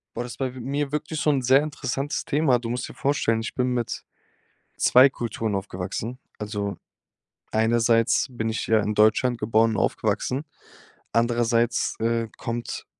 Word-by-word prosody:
Boah, 120 Hz, -, -2 dB
das 120 Hz, -, -8 dB
bei 130 Hz, -2 st, -2 dB
we -, -, -8 dB
mir 140 Hz, +3 st, -2 dB
wirklich 155 Hz, +1 st, -3 dB
so 150 Hz, -, +2 dB
'n 140 Hz, -3 st, +2 dB
sehr 130 Hz, +3 st, +5 dB
interessantes 145 Hz, -1 st, -3 dB
Thema. 140 Hz, -4 st, +2 dB
Du 115 Hz, -1 st, -5 dB
musst 120 Hz, +1 st, -3 dB
dir -, -, -10 dB
vorstellen, 135 Hz, -5 st, 0 dB
ich 115 Hz, -, -5 dB
bin 125 Hz, -1 st, 0 dB
mit 120 Hz, -2 st, -3 dB, 0.7 s
2 130 Hz, +2 st, +6 dB
Kulturen 115 Hz, -4 st, -3 dB
aufgewachsen. 100 Hz, +5 st, -4 dB, 0.2 s
Also, 105 Hz, -2 st, -3 dB, 0.8 s
einerseits 115 Hz, +2 st, +3 dB
bin 115 Hz, -3 st, -3 dB
ich 110 Hz, -, -3 dB
ja 110 Hz, -1 st, +4 dB
in 105 Hz, +1 st, -1 dB
Deutschland 110 Hz, +4 st, +3 dB
geboren 110 Hz, +1 st, +3 dB
und 110 Hz, -, -2 dB
aufgewachsen, 135 Hz, +4 st, 0 dB, 0.7 s
andererseits, 115 Hz, 0 st, +1 dB
äh, 115 Hz, 0 st, 0 dB
kommt 115 Hz, +1 st, -4 dB
120 Hz, 155 wpm, -25 LUFS, 110-130 Hz, 0.8 s, 2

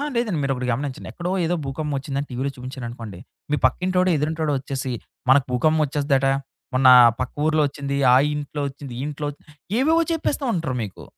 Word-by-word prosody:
లేదండి. 225 Hz, -8 st, 0 dB
మీరు 135 Hz, 0 st, +1 dB
ఒకటి 125 Hz, 0 st, -3 dB
గమనించండి. 135 Hz, +1 st, -4 dB
ఎక్కడో 175 Hz, +1 st, -3 dB
ఏదో 175 Hz, -, +1 dB
భూకంపం 145 Hz, +1 st, -3 dB
వచ్చిందని 140 Hz, +1 st, -3 dB
టీవీలో 130 Hz, +2 st, -2 dB
చూపించారనుకోండి. 120 Hz, -6 st, -7 dB, 0.3 s
మీ -, -, +4 dB
పక్కింటోడ 180 Hz, +7 st, +2 dB
ఎదురింటోడ 155 Hz, +1 st, -1 dB
వచ్చేసి 135 Hz, -1 st, -4 dB, 0.4 s
'మనకు 135 Hz, 0 st, +6 dB
భూకంపం 155 Hz, +6 st, +2 dB
వచెస్తాదట. 140 Hz, -1 st, +1 dB, 0.5 s
మొన్న 130 Hz, 0 st, +5 dB, 0.3 s
పక్క 130 Hz, -, -3 dB
ఊర్లో 155 Hz, -1 st, +3 dB
వచ్చింది, 140 Hz, 0 st, -4 dB, 0.2 s
ఆ -, -, +7 dB, 0.2 s
ఇంట్లో 145 Hz, 0 st, -4 dB
వచ్చింది. 135 Hz, -2 st, -9 dB
ఈ -, -, -3 dB
ఇంట్లో 150 Hz, 0 st, -5 dB
వచ్చింది' 150 Hz, +1 st, -19 dB, 0.3 s
ఏవేవో 320 Hz, +5 st, +4 dB
చెప్పేస్తా 295 Hz, -3 st, -1 dB
ఉంటరు 160 Hz, -7 st, -2 dB
మీకు. 100 Hz, -, -8 dB
140 Hz, 165 wpm, -23 LUFS, 130-155 Hz, 0.5 s, ఆ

